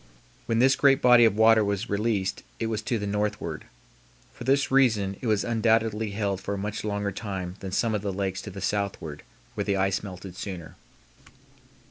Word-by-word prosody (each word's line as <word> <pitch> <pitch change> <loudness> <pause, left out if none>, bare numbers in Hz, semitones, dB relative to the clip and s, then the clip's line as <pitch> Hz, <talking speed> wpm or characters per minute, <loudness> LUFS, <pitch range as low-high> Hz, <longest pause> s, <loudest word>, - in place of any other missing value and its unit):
When 115 - +1
this 130 +3 +5
great 135 -1 +4
body 120 -1 +7
of 110 -3 +3
water 110 0 +5
was 100 +2 -2
released 100 -2 -1 0.2
it 115 - -1
was 110 -1 -2
to 115 +2 -1
the 105 - -4
northward. 105 -5 -2 0.7
For 120 - -9
this 140 +1 +2
reason 110 -8 +3
it 125 - -3
was 105 -2 +2
undoubtedly 110 -1 +1
held 100 -2 -2
for 100 +1 -3
a - - -5
much 105 +2 -4
longer 100 -1 -2
time 95 -3 -5
than 95 - -6
some 115 +4 +1
of 105 - -1
the 100 -1 -2
lakes 95 -1 -2
to - - -8
the 100 0 -8
southward 95 -7 -3 0.3
where - - -2
the 100 - 0
ice 95 0 +1
melted 95 -2 -9
sooner. 90 -5 -7
105 Hz, 190 wpm, -26 LUFS, 95-115 Hz, 0.7 s, body